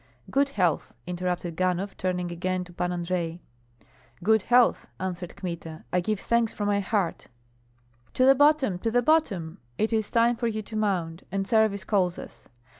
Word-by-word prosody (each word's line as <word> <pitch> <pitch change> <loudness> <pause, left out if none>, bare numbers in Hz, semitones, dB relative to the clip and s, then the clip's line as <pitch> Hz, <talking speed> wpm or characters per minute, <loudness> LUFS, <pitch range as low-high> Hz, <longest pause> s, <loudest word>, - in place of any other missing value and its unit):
"Good 280 +1 +3
health!" 175 -5 +1
interrupted 180 -1 -3
Ganhoff, 185 +2 -1
turning 180 -1 -2
again 185 +1 -2
to 180 0 -14
Pan 180 +1 -1
Andrei. 175 -1 -2 0.8
"Good 220 +2 +4
health!" 245 +4 +3
answered 180 -2 -4
Kmita, 165 -3 -6
"I 180 - +4
give 205 +3 -1
thanks 235 0 +1
from 205 - -3
my 205 0 +2
heart." 195 -3 -1 0.9
"To 255 - +4
the 270 - +8
bottom, 285 -9 +3
to 225 - -1
the 245 +2 +2
bottom! 200 - +1 0.2
It 220 +1 0
is 220 -2 0
time 235 0 +3
for 235 - -1
you 215 -1 -2
to 220 - -9
mount, 185 -6 -1
and 195 0 -2
service 220 -3 +2
calls 180 -3 +1
us. 115 - -11
190 Hz, 170 wpm, -26 LUFS, 175-220 Hz, 0.9 s, the